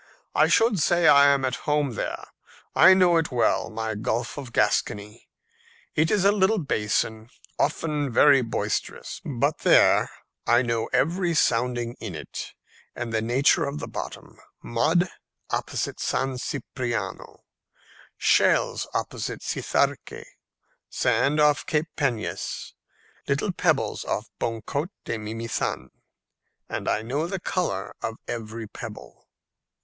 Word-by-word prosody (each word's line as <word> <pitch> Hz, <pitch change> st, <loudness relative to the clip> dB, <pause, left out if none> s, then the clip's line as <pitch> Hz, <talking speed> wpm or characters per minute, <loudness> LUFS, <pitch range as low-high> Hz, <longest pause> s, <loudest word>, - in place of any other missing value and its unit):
I -, -, +4 dB
should 225 Hz, -4 st, +3 dB
say 175 Hz, +1 st, +3 dB
I 140 Hz, -1 st, +8 dB
am 140 Hz, -1 st, +3 dB
at 130 Hz, -, -1 dB
home 145 Hz, -3 st, +1 dB
there. -, -, -4 dB, 0.5 s
I 190 Hz, -, +8 dB
know 180 Hz, -2 st, +5 dB
it 160 Hz, -3 st, 0 dB
well, 115 Hz, -2 st, +1 dB
my 110 Hz, 0 st, -3 dB
Gulf 115 Hz, +3 st, -2 dB
of 135 Hz, -4 st, -7 dB
Gascony. 105 Hz, 0 st, -1 dB, 0.6 s
It 160 Hz, +1 st, +2 dB
is 195 Hz, -2 st, +2 dB
a 200 Hz, -, +7 dB
little 205 Hz, +1 st, +2 dB
basin, 110 Hz, -, -1 dB, 0.3 s
often 150 Hz, -2 st, 0 dB
very 140 Hz, +3 st, +6 dB
boisterous; 115 Hz, -2 st, -3 dB
but -, -, -1 dB
there, -, -, +5 dB, 0.4 s
I 120 Hz, +2 st, +5 dB
know 115 Hz, -2 st, -1 dB
every 170 Hz, +2 st, +1 dB
sounding 120 Hz, -3 st, +1 dB
in 105 Hz, -7 st, -6 dB
it 75 Hz, -, -7 dB, 0.4 s
and 120 Hz, -1 st, -5 dB
the 110 Hz, -, +1 dB
nature 135 Hz, +8 st, +3 dB
of 140 Hz, +1 st, -4 dB
the -, -, -5 dB
bottom -, -, -8 dB, 0.2 s
mud 160 Hz, +10 st, +2 dB, 0.4 s
opposite -, -, -2 dB
San 135 Hz, -1 st, -1 dB
Cipriano, 125 Hz, -2 st, -4 dB, 0.7 s
shells -, -, +2 dB
opposite -, -, -3 dB
Cizarque, -, -, -1 dB, 0.6 s
sand 125 Hz, +6 st, +1 dB
off 150 Hz, -1 st, +4 dB
Cape 155 Hz, +1 st, 0 dB
Peñas, 125 Hz, -7 st, -3 dB, 0.5 s
little -, -, 0 dB
pebbles -, -, 0 dB
off -, -, -3 dB
Boncaut 120 Hz, +8 st, -2 dB, 0.2 s
de 115 Hz, -, -3 dB
Mimizan, 115 Hz, +2 st, -3 dB, 0.8 s
and -, -, -3 dB
I 110 Hz, -, 0 dB
know 140 Hz, +8 st, -2 dB
the 190 Hz, +1 st, -3 dB
colour 135 Hz, -, -2 dB
of 115 Hz, -, -3 dB
every 115 Hz, -1 st, -5 dB
pebble." -, -, -10 dB
130 Hz, 125 wpm, -25 LUFS, 115-155 Hz, 0.8 s, I